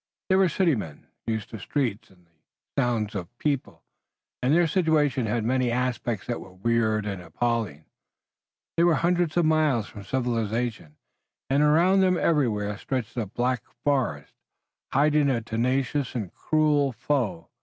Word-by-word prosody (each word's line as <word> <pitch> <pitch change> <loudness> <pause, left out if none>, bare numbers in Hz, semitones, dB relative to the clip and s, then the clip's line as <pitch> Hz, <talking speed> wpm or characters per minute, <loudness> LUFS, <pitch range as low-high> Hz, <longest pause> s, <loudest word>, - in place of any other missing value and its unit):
They 190 - +4
were 190 -1 +4
city 170 0 +2
men, 80 - -5 0.2
used 110 -2 -3
to 110 - -6
the - - -12
streets 120 -6 -2
and 90 -2 -23
the 85 - -36 0.4
sounds 120 -4 0
of 100 +3 -6
people, 140 -2 -2 0.6
and 130 +2 +2
their 170 +3 +5
situation 150 - +2
had 110 +1 0
many 125 +1 +1
aspects 120 -3 -1
that 120 - -3
were 90 - -12
weird 110 +1 +1
and 100 -3 -4
appalling. 90 -2 -2 0.9
They 170 - +3
were 170 -2 +5
hundreds 175 +1 +1
of 175 - +4
miles 155 -8 +2
from 100 - -10
civilization, 115 - -2 0.5
and 140 +2 +3
around 170 +6 +4
them 185 -1 +3
everywhere 110 -12 +1
stretched 130 -5 -3
a 115 -4 -2
black 120 +3 -1 0.2
forest, 130 - 0 0.6
hiding 145 +1 +3
a 125 -3 +1
tenacious 130 +4 -1
and 105 -7 -4
cruel 150 -3 +2
foe. 120 - -2
125 Hz, 155 wpm, -26 LUFS, 110-150 Hz, 0.9 s, their